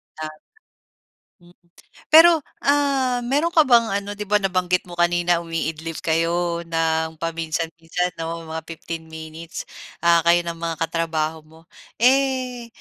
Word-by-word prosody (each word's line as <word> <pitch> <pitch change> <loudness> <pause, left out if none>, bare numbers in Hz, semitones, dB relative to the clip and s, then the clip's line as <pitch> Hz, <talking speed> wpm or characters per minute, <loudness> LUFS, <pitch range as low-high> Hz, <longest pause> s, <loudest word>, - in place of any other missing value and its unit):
Tama. 155 0 -7 1.0
Hmm, 175 0 -21 0.6
pero, 325 -1 +8 0.2
ah, 270 -4 +2
meron 280 +7 +1
ka 315 - +7
bang 235 -4 +4
ano, 200 0 -3
'di 210 0 -6
ba 210 - +2
nabanggit 180 -1 +1
mo 180 - -14
kanina 175 0 +2
umiidlip 165 -1 -4
kayo 170 +1 0
nang 160 -1 0
paminsan-minsan 165 +1 -3
'no, 165 0 -4
mga 160 0 -5
15 165 0 -7
minutes, 160 +1 -8 0.4
ah, 170 0 +5
kayo 175 0 +5
ng 170 -1 -5
mga 165 -1 -3
katrabaho 160 -1 -2
mo. 160 +1 -18 0.4
Eh, 255 -1 +1
170 Hz, 130 wpm, -22 LUFS, 165-210 Hz, 1.0 s, pero